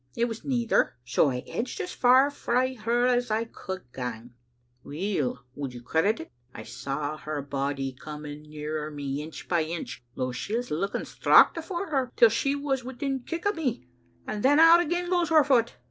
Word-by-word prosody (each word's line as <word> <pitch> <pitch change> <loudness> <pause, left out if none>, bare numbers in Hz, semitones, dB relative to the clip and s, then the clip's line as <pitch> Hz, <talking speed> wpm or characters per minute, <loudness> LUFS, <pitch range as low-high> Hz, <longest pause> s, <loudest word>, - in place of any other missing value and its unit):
* - - -33
It 235 - +2
was 225 -1 -6
neither, 240 -4 +1
so 130 +3 +3
I 125 -1 -3
edged 245 - -4
as 375 -3 -3
far 260 +3 +5
frae 255 -2 0
her 240 +1 +1
as 245 -1 +2
I 220 +1 +1
could 190 -4 -7
gang, 120 -2 -6 0.5
Weel, 145 -5 -2
would 135 -3 -5
you 120 - -9
credit 165 - +1
it, 160 - -9 0.2
I - - -7
saw 140 +4 -4
her 155 -1 -4
body 135 -1 -2
coming 150 +2 -8
nearer 150 0 -5
me 145 -1 -4
inch 155 +1 -9
by 175 -2 +2
inch, 160 -6 -6
though 130 -1 -2
she 165 - -3
was 245 +1 -4
looking 190 +7 -2
straucht - - +5
afore 345 +2 -4
her, 265 -3 0
till 230 - +7
she 275 +6 0
was 275 -2 -1
within 265 +2 -3
kick 335 +8 -6
o' 410 - +4
me, 255 - -3 0.4
and 210 - -4
then 285 +5 +5
out 330 +1 +8
again 350 +1 -1
goes 350 -2 +1
her 315 -2 +6
foot. 245 -5 +2
215 Hz, 190 wpm, -27 LUFS, -, 0.5 s, out